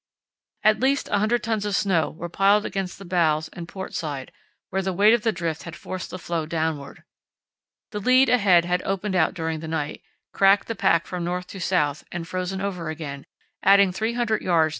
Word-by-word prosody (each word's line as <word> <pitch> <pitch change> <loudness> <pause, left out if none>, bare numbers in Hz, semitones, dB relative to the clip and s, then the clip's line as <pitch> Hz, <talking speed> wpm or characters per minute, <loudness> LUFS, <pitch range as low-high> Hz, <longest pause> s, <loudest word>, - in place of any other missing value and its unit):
At 215 -1 +4
least 270 +3 +1
100 215 +3 +1
tons 220 -2 -1
of 205 -1 -1
snow 180 -6 +2
were 175 +2 -7
piled 195 +4 +3
against 195 -3 -3
the 195 - -11
bows 160 -3 +1
and 170 -1 -8
port 190 +1 -7
side, 145 -6 -4 0.4
where 195 - 0
the 190 0 -2
weight 205 +5 +5
of 235 - +2
the 225 0 +1
drift 165 -6 -3
had 170 +2 -8
forced 185 -1 -6
the - - -6
floe 170 -3 -3
downward. 160 -3 -3 0.9
The 210 - -3
lead 255 +5 +5
ahead 195 -8 +4
had 180 +1 0
opened 195 +1 -2
out 160 -3 +2
during 160 -1 -2
the 160 - -7
night, 155 -2 -3 0.3
cracked 195 +1 +4
the 230 - -2
pack 185 -5 +2
from 180 -1 -4
north 180 +1 -2
to 195 - -8
south 150 -6 0
and 170 -1 -5
frozen 185 +1 -3
over 180 -5 -3
again, 145 -3 -6 0.3
adding 200 0 +6
300 220 +3 -1
yds. 165 -3 +3
185 Hz, 195 wpm, -24 LUFS, 165-205 Hz, 0.9 s, adding